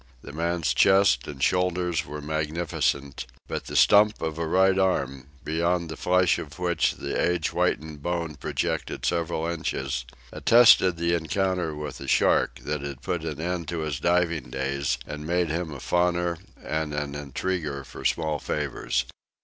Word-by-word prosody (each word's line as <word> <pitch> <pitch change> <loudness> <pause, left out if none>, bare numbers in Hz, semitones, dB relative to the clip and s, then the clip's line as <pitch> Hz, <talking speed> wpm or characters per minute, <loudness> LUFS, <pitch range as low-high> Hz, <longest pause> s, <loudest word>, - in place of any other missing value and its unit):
The 70 - -9
man's 85 +1 0
chest 95 -10 +4
and 70 -2 -5
shoulders 90 -2 +1
were 75 +1 -7
magnificent, 75 -3 -2 0.2
but - - -4
the - - -7
stump 105 +1 +5
of 80 0 -3
a 85 - -1
right 95 +3 +4
arm, 70 -9 0 0.2
beyond 85 +2 0
the 80 - -5
flesh 90 +1 +2
of 80 +1 -8
which 90 -1 +1
the - - -3
age 90 -2 +1
whitened 75 -1 -1
bone 85 -1 -2
projected 70 - -3
several 85 -1 0
inches, 70 -6 -2 0.3
attested 110 -7 +6
the 85 +1 +1
encounter 85 0 -1
with 75 0 -6
a - - -8
shark - - +2
that 75 -1 -2
had 70 -1 -7
put 85 -3 -2
an 80 -3 -4
end 85 0 -3
to 85 0 -3
his 75 -3 -3
diving 85 -4 +1
days 65 0 -1
and 75 0 -7
made 90 0 +1
him 85 +1 -2
a 70 - -7
fawner 85 +1 0 0.3
and 80 -1 -2
an 75 -1 -3
intriguer 75 +1 -3
for - - -11
small 80 -2 0
favors. 65 -3 -2
80 Hz, 160 wpm, -26 LUFS, 75-90 Hz, 0.3 s, attested